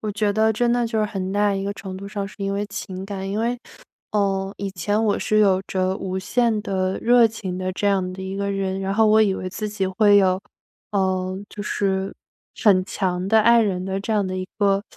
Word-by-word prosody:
我 215 - -3
觉 205 0 0
得 220 +1 +3
真 235 +2 +1
的 240 -1 +1
就 225 -1 -2
是 215 - +2
很 195 -3 -3
大 205 0 +2
一 195 - -2
个 200 - -2
程 190 -2 -8
度 200 +1 -8
上 200 -1 -4
是 200 - -12
因 195 0 -2
为 205 +1 -2
情 190 -2 -6
感。 195 -1 -5
因 200 - -2
为， 235 +2 0 0.5
呃， 195 -2 0
以 200 -1 -4
前 205 +4 -1
我 210 -2 +1
是 215 - +1
有 195 -3 +4
着 185 0 0
无 190 0 -3
限 230 +2 +1
的 190 -3 -1
热 240 0 +6
情 205 -5 -5
的 185 0 -3
这 205 +2 -2
样 190 -2 +1
的 190 - -7
一 190 +1 -5
个 200 0 -1
人， 195 -1 -2
然 195 0 -2
后 220 +1 +4
我 215 +1 +5
以 195 -3 +2
为 185 - -4
自 210 +3 -4
己 200 -2 -2
会 205 +2 +4
有， 190 -1 +3 0.5
呃， 185 -1 0
就 205 - -7
是 195 -2 -1 0.5
很 190 -4 +5
强 185 -2 -2
的 220 +1 +5
爱 235 +1 +5
人 185 -3 -1
的 195 0 -2
这 220 +3 -3
样 205 -2 +1
的 185 0 -3
一 185 - -4
个 200 -1 +2
200 Hz, 255 characters per minute, -22 LUFS, 190-210 Hz, 0.5 s, 热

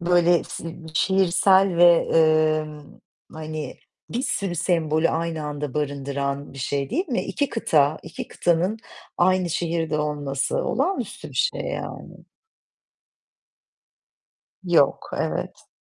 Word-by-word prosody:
böyle 175 0 +3
s - - -8
ııı, 165 - -6 0.2
şiirsel 190 +1 +3
ve, 175 0 +6
eee, 155 -1 +4 0.7
hani, 155 -3 -6 0.3
bir 245 - -2
sürü 200 -8 -1
sembolü 160 -2 +1
aynı 165 -1 -2
anda 145 -2 -5
barındıran 140 -1 -3
bir 135 - -11
şey, 140 +1 -2
değil 340 - -1
mi? 250 - 0
2 285 - -1
kıta, 155 -10 +2
2 165 - -8
kıtanın 175 +6 0 0.4
aynı 185 0 +3
şehirde 165 -2 -1
olması 145 -2 -2
olağanüstü 310 - -2
bir - - +1
şey - - -5
yani. - - -7 2.4
Yok, 170 -6 +2
evet. - - -3
165 Hz, 115 wpm, -23 LUFS, 150-180 Hz, 2.4 s, ve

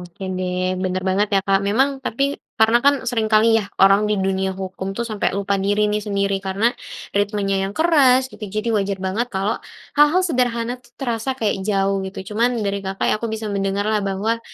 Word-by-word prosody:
oke 175 +2 -12 0.2
deh. 185 0 -1
Bener 185 0 -1
banget 200 +2 +1
ya - - +4
Kak, 195 0 +3
memang 270 +5 +1
tapi 275 +5 -1 0.2
karena 225 +2 +5
kan 285 0 +6
seringkali 220 -2 +2
yah 200 - -7
orang 195 +2 +5
di 210 - +1
dunia 190 0 -1
hukum 190 0 -5
tuh 235 - -1
sampe 215 -3 -1
lupa 200 0 0
diri 205 +1 +2
nih 210 0 0
sendiri, 200 -2 -1
karena 200 +5 0 0.4
ritmenya 205 -1 0
yang 200 - -10
keras 285 -6 +5
gitu, - - -14
jadi 215 +3 -3
wajar 200 -2 0
banget 220 +6 -1
kalau 195 +1 -2 0.4
hal-hal 295 +5 +5
sederhana 245 -5 -1
tuh 240 0 -24
terasa 240 -1 -2
kayak 210 -5 -1
jauh, 195 -1 +1
gitu. 190 +2 -8
Cuman 240 +3 +1
dari 200 0 -1
Kakak 195 0 -4
ya - - +3
aku 230 - -2
bisa 220 0 -4
mendengarlah 200 +2 0
bahwa 220 +4 -1
210 Hz, 190 wpm, -21 LUFS, 195-235 Hz, 0.4 s, kan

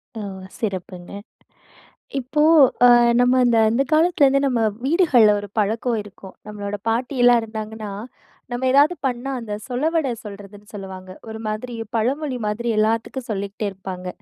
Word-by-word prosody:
ஓ! - - -5 0.4
சிறப்புங்க. 185 -4 -5 1.1
இப்போ 270 +4 -1 0.5
அ - - +8 0.3
நம்ம 250 +1 +4
இந்த 230 -1 +3
அந்த 235 +4 +2
காலத்துலேருந்து 305 -4 +4
நம்ம 245 -3 0 0.2
வீடுகள்ல 275 - +4
ஒரு 205 - -9
பழக்கம் 225 +3 0
இருக்கும். 195 -1 -13
நம்மளோட 205 -1 -5
பாட்டியெல்லாம் 245 0 +3
இருந்தாங்கன்னா, 220 -1 -6 0.6
நம்ம 245 +2 -2
ஏதாவது 290 +5 +5
பண்ணா 250 +1 -3
அந்த 225 -3 -7
சொலவட 290 +3 0
சொல்றதுனு 205 0 -11
சொல்லுவாங்க 190 -2 -9 0.2
ஒரு 220 0 -7
மாதிரி 220 +3 -4 0.2
பழமொழி 265 +4 -1
மாதிரி 230 +3 -2
எல்லாத்துக்கு 225 +4 0
சொல்லிகிட்டே 200 0 -4
இருப்பாங்க. 185 -1 -7
225 Hz, 125 wpm, -21 LUFS, 205-260 Hz, 1.1 s, அ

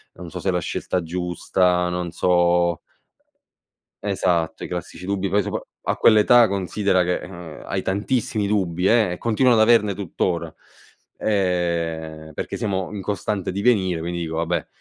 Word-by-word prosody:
"Non 85 -1 -9
so 90 - -7
se 95 - -1
è - - +3
la 90 - 0
scelta 90 +2 -2
giusta, 90 +1 0
non 90 -1 -3
so" 85 0 +2 1.2
Esatto, 90 -5 0
i - - -4
classici 90 +1 -6
dubbi 100 0 -1
poi 100 +2 +2
sopra - - -3 0.2
a - - -1
quell'età 115 +2 +6
considera 100 -1 +1
che, 90 +1 0
uhm, 85 -4 -10
hai - - -2
tantissimi 105 +1 -1
dubbi, 95 -3 0
eh 110 -5 +4
e 90 - -4
continuano 115 0 +3
ad - - +6
averne 105 -4 +4
tuttora, 85 -3 -2 0.6
ehm, 85 -5 -1
perché - - -4
siamo 100 -3 -2
in 100 - -5
costante 100 0 -2
divenire, 95 -4 +1
quindi 85 +1 -3
dico: 80 -1 -4
"Vabbè, 85 +1 -1
90 Hz, 155 wpm, -22 LUFS, 85-100 Hz, 1.2 s, quell'età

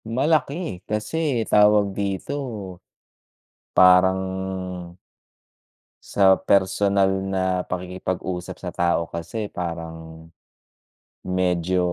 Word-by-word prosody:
malaki 140 - -1
kasi 120 +3 -1
tawag 105 -1 +5
dito, 100 +5 -3 1.4
parang 95 +1 +6 1.9
sa 95 -1 +6
personal 100 0 +2 0.2
na 95 -1 -1
pakikipag-usap 90 0 -4
sa - - -5
tao 85 -1 0
kasi 100 +6 -5
parang 80 -2 -7 1.0
medyo 90 -1 0
95 Hz, 70 wpm, -23 LUFS, 90-105 Hz, 1.9 s, parang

